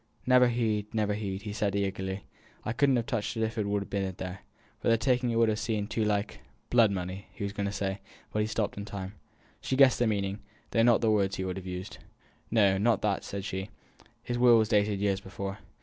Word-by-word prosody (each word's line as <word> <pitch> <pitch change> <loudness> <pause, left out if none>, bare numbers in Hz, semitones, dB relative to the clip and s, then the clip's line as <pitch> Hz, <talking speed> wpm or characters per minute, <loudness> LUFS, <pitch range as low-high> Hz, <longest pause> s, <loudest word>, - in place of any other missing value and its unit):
"Never 125 0 +6
heed, 110 -3 0
never 105 -2 +1
heed," 100 0 -4
said 100 -2 0
he, 100 0 +2
eagerly; 95 0 -4 0.4
"I 110 - -1
couldn't 135 +2 +3
have 120 -2 0
touched 115 0 -2
it 110 - +1
if 110 +1 -2
it 105 - 0
had 100 0 -1
been 95 -2 -1
there, 90 +1 -5 0.4
for - - -3
the 115 - +5
taking 125 0 +1
it 115 - 0
would 115 0 +4
ha' 110 - +2
seemed 110 -1 -2
too 110 - 0
like 105 -1 -1 0.2
" - - -40
Blood 115 -3 +6
money, 95 +1 -4
he - - -6
was 100 0 -3
going 100 -1 -2
to - - -2
say, 100 -1 -2 0.3
but 105 - 0
he 105 - +1
stopped 110 -2 -2
in 100 - -5
time. 100 -2 -6 0.5
She 130 - -1
guessed 135 -2 +6
the 120 - +3
meaning, 100 -1 -1 0.3
though 115 - +3
not 120 0 +5
the 115 -2 +3
word 100 -2 +2
he 95 - -3
would 95 0 -3
have 95 -1 -7
used. 90 +1 -6 0.5
"No, 100 -4 +4
not 115 0 +2
that," 105 -2 0
said 100 -1 -5
she; 95 +2 -4 0.5
"his 120 0 -2
will 120 -1 +7
was 110 -1 +2
dated 105 -2 +2
years 100 -1 +1
before. 95 0 -6
105 Hz, 235 wpm, -29 LUFS, 100-115 Hz, 0.5 s, will